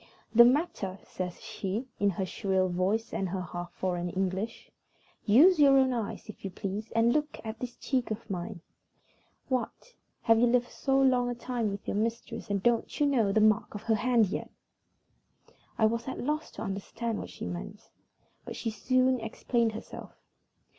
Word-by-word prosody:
"The 235 +1 +9
matter!" 245 - +1
says 180 -1 -5
she, 220 +2 -4
in 205 - +3
her 190 0 -2
shrill 190 -1 0
voice 190 +6 0
and 190 - -1
her 185 +1 -2
half 175 0 -6
foreign 175 -1 -2
English. 190 +5 -3 0.5
"Use 300 - +6
your 275 -2 +7
own 260 -1 +4
eyes, 230 -2 -4
if 215 - -11
you 195 - -3
please, 200 +3 -5
and 230 +1 +4
look 300 0 -1
at 220 0 -5
this 245 -1 -5
cheek 255 -3 -1
of 220 +1 -5
mine. 185 -1 -5 0.9
What! 260 - -3 0.3
have 225 -1 +5
you 245 - +5
lived 245 0 +2
so 270 -1 +1
long 250 -2 +3
a 245 - -2
time 240 -2 -2
with 200 0 -6
your - - -1
mistress, 230 +1 -3
and 200 -1 -1
don't 235 -1 +1
you 295 - +4
know 240 -8 +2
the 215 - +3
mark 215 0 +3
of 210 - -6
her 225 - +2
hand 235 +1 +3
yet?" - - -4 1.3
I 220 - +4
was 230 +3 0
at 260 - -4
a - - -5
loss 305 +4 -1
to 215 - -6
understand 215 +3 -3
what - - -6
she - - -7
meant, 200 +4 -7 0.5
but - - -7
she 225 - -3
soon 255 +3 +2
explained 225 +1 0
herself. 220 - -9
225 Hz, 180 wpm, -29 LUFS, 195-245 Hz, 1.3 s, The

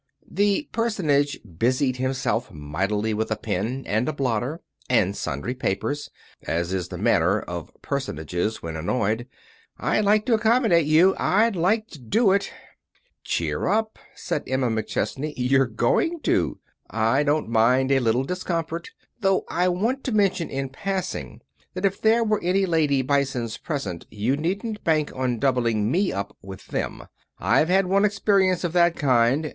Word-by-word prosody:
The 205 - +1
personage 165 -12 +1 0.2
busied 130 +2 +1
himself 130 -2 -1
mightily 100 +9 -2
with 110 +1 -1
a 110 - 0
pen, 110 +6 -3
and 110 +7 0
a - - -2
blotter, 130 +3 -1 0.3
and 100 -6 +2
sundry 70 - -3
papers, 130 +4 -2 0.3
as 85 +2 -2
is 90 -2 -2
the - - -7
manner - - +2
of - - -6
personages 90 +8 -3
when 80 -1 -5
annoyed. 110 +7 -1 0.5
"I'd 215 - +1
like 210 +1 +3
to 245 - +2
accommodate 220 - +3
you; 165 +5 +5
I'd 220 +2 +2
like 210 +6 +1
to 155 - -11
do 200 - +2
it." 200 0 +1 0.7
"Cheer - - -1
up," 220 0 0 0.2
said 150 - -3
Emma 130 -1 0
McChesney, 135 +6 -2
"you're 130 +1 +3
going 120 - +1
to. - - +1 0.3
I 115 +5 +2
don't 150 -1 +1
mind 125 +4 +3
a 135 - +4
little 120 +1 +1
discomfort. 170 0 -3 0.3
Though 195 -3 +2
I 180 +1 +1
want 225 +10 0
to 260 - -1
mention 195 -5 +1
in 135 0 -3
passing 190 +7 -4 0.3
that 185 +2 -1
if 195 0 0
there 225 +1 +4
are 215 -2 0
any 190 +2 +2
lady 150 -6 +2
Bisons 130 -5 -1
present 140 - -5
you 110 +6 0
needn't 200 +8 -3
bank 155 -2 +1
on 130 -2 -1
doubling 115 -4 +1
me 185 +5 +1
up 100 +1 -4
with 95 0 -10
them. - - -3 0.3
I've 160 - +2
had 190 +1 +4
one 195 +2 +2
experience 195 -3 +2
of 175 -2 -2
that 175 -1 +4
kind. 130 +1 +2
145 Hz, 155 wpm, -24 LUFS, 115-190 Hz, 0.7 s, you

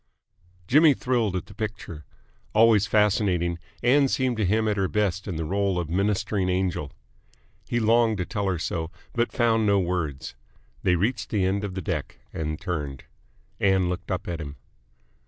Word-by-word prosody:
Jimmy 150 - +5
thrilled 120 -7 0
at 90 - -3
the - - -14
picture. 105 -8 -6 0.5
Always 110 -2 +5
fascinating, 95 -5 +2 0.2
Ann 135 +3 +5
seemed 130 -3 0
to 110 - +1
him 110 +3 +2
at 105 - +1
her 95 -2 +1
best 100 -1 -1
in 95 - -3
the 80 0 -3
role 100 +1 0
of 85 -2 -3
ministering 100 0 0
angel. 90 -6 -1 0.8
He 120 - 0
longed 115 -1 +3
to 90 - -2
tell 100 0 -2
her 95 -2 0
so, 80 0 -3 0.2
but 120 0 0
found 115 -3 +2
no 100 -1 +4
words. 85 -7 -2 0.5
They 90 - +3
reached 110 +8 -1
the 100 -4 +1
end 100 +2 0
of 100 -3 -4
the 95 - -4
deck, - - -3 0.2
and 75 -1 -3
turned. 75 -8 -4 0.6
Ann 95 -2 +3
looked 90 0 -5
up 95 +3 -3
at 85 -1 -3
him. 70 -1 -7
100 Hz, 175 wpm, -25 LUFS, 90-110 Hz, 0.8 s, Jimmy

